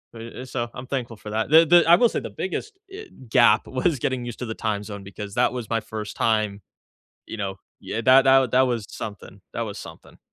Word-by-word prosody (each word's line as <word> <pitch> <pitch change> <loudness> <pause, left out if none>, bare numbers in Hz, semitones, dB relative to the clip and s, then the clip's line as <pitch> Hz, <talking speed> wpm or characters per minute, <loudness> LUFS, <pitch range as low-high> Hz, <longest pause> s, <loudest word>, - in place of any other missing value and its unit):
eh 115 +2 -9
eh, - - -7
so 120 -2 -4
I'm 125 +1 -8
thankful 120 -4 -4
for 105 - -10
that. 110 +1 -1
The 160 +2 +7
the 175 +1 +6
I 170 - +9
will 240 +4 +4
say - - -2
the - - -6
biggest, 430 -3 -5
eh, 420 +2 -8 0.2
gap 115 -3 +4
was 135 +2 0
getting 125 0 -2
used 120 -2 -7
to 125 - -4
the 110 - -5
time 105 -2 -2
zone 100 -1 -8
because 100 +1 -8
that 125 - +2
was 120 -4 -6
my 115 - +1
first 105 -1 -7
time 110 -3 0 0.7
you - - -7
know 95 -2 -3 0.2
Yeah, 110 - -4
tha 130 +3 +7
tha 135 -1 +5
that 130 - +5
was 115 -4 -4
something, 100 -2 -9
that 115 - -2
was 105 -3 -6
something. - - -12
115 Hz, 230 wpm, -24 LUFS, 105-130 Hz, 0.7 s, I